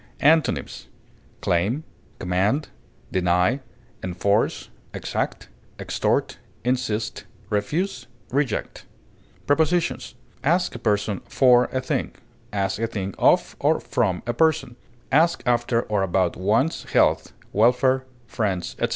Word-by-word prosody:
Antonyms: 160 +2 +2 0.5
claim, 100 - +1 0.3
deny, 90 - 0 0.4
enforce, 100 +4 0 0.3
exact, - - -3 0.3
extort, - - -1 0.2
insist, 120 -3 -1 0.3
refuse, 155 - -1 0.2
reject. 135 -3 -1
command, - - -32
Prepositions: 160 +4 +1 0.3
Ask 175 +5 +2
a - - -7
person 105 -2 0
for 125 -2 +5
a 130 - -3
thing; 130 - -2 0.4
ask 100 0 -1
a 115 - +1
thing 100 -4 -4
of - - +3
or - - +2
from 90 -1 -1
a 120 - -1
person; 160 -6 +1 0.4
ask 165 +4 +3
after 120 -1 +2
or 105 -2 -1
about 95 -2 +1
one's 110 - +1
health, - - +2 0.2
welfare, 125 +4 +3 0.2
friends, 100 -6 -2
etc. - - +1
115 Hz, 110 wpm, -24 LUFS, 100-135 Hz, 0.5 s, for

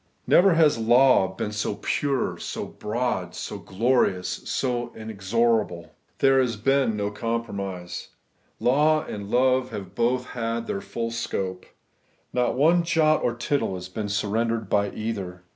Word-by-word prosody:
Never 180 -1 +5
has 155 -7 +4
law 120 -2 +5
been 95 +2 -4
seen 105 -1 -2
so - - -19
pure, 140 -3 0
so - - -4
broad, 105 -5 -3
so 105 - -5
glorious, 95 -2 +1 0.2
so 120 -2 -1
inexorable. 110 -3 -1 0.3
There 135 -1 +4
has 120 -3 0
been 130 0 +1
no 100 0 -1
compromise. 100 -5 -4 0.5
Law 150 +4 +3
and 100 -1 -6
love 130 +2 +2
have 95 -3 -7
both 125 +3 +1
had 115 -1 -3
their 100 - -3
full 115 -1 -4
scope. 95 -5 -3 0.7
Not 125 -1 +1
one 165 +6 +4
jot 160 -2 +2
or 120 - 0
tittle 130 -5 -1
has 90 0 -7
been 105 +2 -4
surrendered 110 +2 -1
by 100 -1 +2
either. 100 -5 -5
115 Hz, 145 wpm, -25 LUFS, 100-130 Hz, 0.7 s, Never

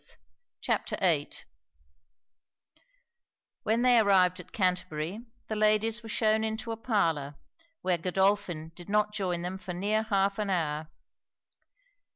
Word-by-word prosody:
] - - -58
CHAPTER - - -1
VIII 160 -6 +2 2.3
When 225 +3 +1
they 250 -2 +6
arrived 185 -4 +4
at 180 - -12
Canterbury, 180 +2 -2 0.2
the 215 - -3
ladies 215 +2 +2
were 225 - -10
shewn 220 0 +2
into 220 +1 -3
a - - -2
parlour, 165 - 0 0.5
where 180 -2 +1
Godolphin 185 -3 0
did 175 +2 -12
not 210 0 +2
join 180 -4 -2
them 185 +2 -4
for 180 -1 -6
near 210 +4 +1
half 200 -2 0
an 210 -1 -1
hour. 155 -4 -1
195 Hz, 130 wpm, -29 LUFS, 175-215 Hz, 2.3 s, they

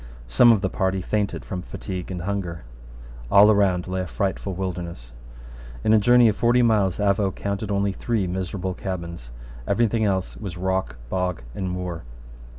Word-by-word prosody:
Some - - +6
of 110 -4 +3
the 95 - 0
party 95 0 0
fainted 100 +2 -2
from 90 -2 -4
fatigue 90 0 -6
and 90 -2 -5
hunger. 90 -5 -3 0.7
All 105 - +7
around 95 -4 +2
lay 95 0 -2
a 90 - -4
frightful 95 +1 -2
wilderness. 85 -9 -5 0.7
In 110 - +4
a 110 - +6
journey 120 +3 +6
of 105 - +2
forty 120 +2 +3
miles 105 -6 +2
Avaux 100 -1 +1
counted 100 +1 -3
only 100 0 +1
three 110 +1 -1
miserable 95 +1 -3
cabins. 85 -9 -6 0.4
Every 120 - +3
thing 115 0 0
else 95 -3 0
was 95 -5 -7
rock, 95 -6 -1 0.2
bog, 90 -6 -1
and 95 +5 -3
moor. 90 -3 -4
95 Hz, 165 wpm, -24 LUFS, 90-100 Hz, 0.7 s, All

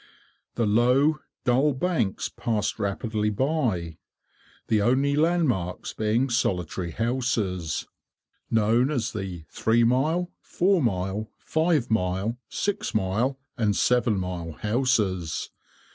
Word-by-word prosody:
The 115 - +1
low, 125 +8 +3 0.3
dull 135 +4 +3
banks 135 - 0
passed 110 -3 -2
rapidly 105 +1 -1
by, 105 - -1 0.7
the 110 -2 +2
only 135 +6 +2
land 165 +2 +3
marks 90 -7 -2
being 110 +4 +1
solitary 90 -6 -1
houses, 110 - -1 0.6
known 115 +4 +3
as 125 -7 -1
the 95 -6 -5
three 115 +1 +2
mile, 155 +9 +1
four 185 0 +1
mile, 100 -1 -1
five 160 -6 0
mile, 100 +3 0
six 205 - -2
mile, 110 +7 0 0.2
and 105 -3 +2
seven 125 -4 +2
mile 90 -3 -4
houses. 105 - 0
115 Hz, 110 wpm, -26 LUFS, 95-130 Hz, 0.7 s, low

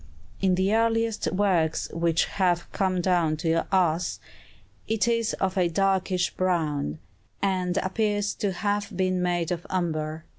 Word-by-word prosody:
In 190 -2 +3
the 190 +3 +1
earliest 225 0 +1
works 180 -5 +1
which 165 -1 +1
have 175 -3 0
come 185 -2 0
down 170 -4 +2
to 165 +1 0
us, 180 -3 +1 0.7
it 225 +1 +1
is 230 -1 +1
of 190 0 -1
a 180 - +3
darkish 190 0 +1
brown, 155 - -1 0.4
and 185 -2 0
appears 205 +1 0
to 205 - -2
have 205 +2 -2
been 185 -1 +1
made 175 -2 0
of 175 -1 -4
umber. 160 -3 -2
185 Hz, 140 wpm, -26 LUFS, 170-200 Hz, 0.7 s, In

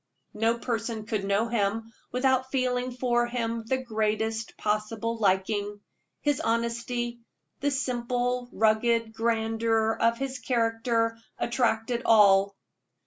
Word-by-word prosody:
No 225 +2 +1
person 225 -2 -3
could 210 -3 -2
know 200 +3 +1
him 225 0 -1 0.2
without 260 0 +1
feeling 255 -1 0
for 240 -1 +1
him 230 -1 -2
the 260 - +1
greatest 220 -2 -2
possible 215 +2 -1
liking; 205 0 0 0.4
his 290 -1 +1
honesty, 235 -1 -1 0.4
the 285 - +1
simple, 245 -2 -1
rugged 225 +1 +2
grandeur 225 0 +1
of 230 0 +3
his 270 0 -4
character, 230 -1 0 0.2
attracted 235 -1 0
all. 200 -2 +5
230 Hz, 110 wpm, -27 LUFS, 220-245 Hz, 0.4 s, all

